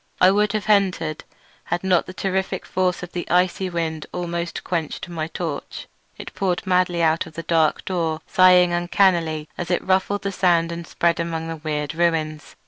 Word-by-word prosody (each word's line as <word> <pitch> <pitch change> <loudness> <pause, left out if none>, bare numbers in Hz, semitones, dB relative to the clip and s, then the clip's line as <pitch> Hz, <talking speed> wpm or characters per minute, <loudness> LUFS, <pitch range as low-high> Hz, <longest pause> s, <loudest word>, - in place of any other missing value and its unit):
I 185 - +6
would 205 +1 +2
have 215 -1 -2
entered 185 -7 +1 0.4
had 175 +1 -2
not 185 -2 +2
the 185 - -8
terrific 190 -1 -2
force 180 -1 -1
of 175 - -7
the 175 - -5
icy 180 +1 +2
wind 165 -3 -3
almost 170 -1 -4
quenched 170 -1 -3
my 165 -3 -4
torch. 160 -2 -5 0.3
It - - -9
poured 185 -1 -1
madly 180 -2 +2
out 160 +1 +2
of 160 - -13
the 165 - -5
dark 160 -2 +1
door, 165 -4 -1
sighing 180 -1 +5
uncannily 175 -3 +1
as 175 - -3
it 175 - 0
ruffled 190 +2 +1
the 195 - -1
sand 175 -3 +2
and 170 -1 -6
spread 170 0 +1
about 165 -1 -3
the 165 0 -5
weird 150 -2 -3
ruins. 160 -3 -1
175 Hz, 180 wpm, -22 LUFS, 165-185 Hz, 0.4 s, I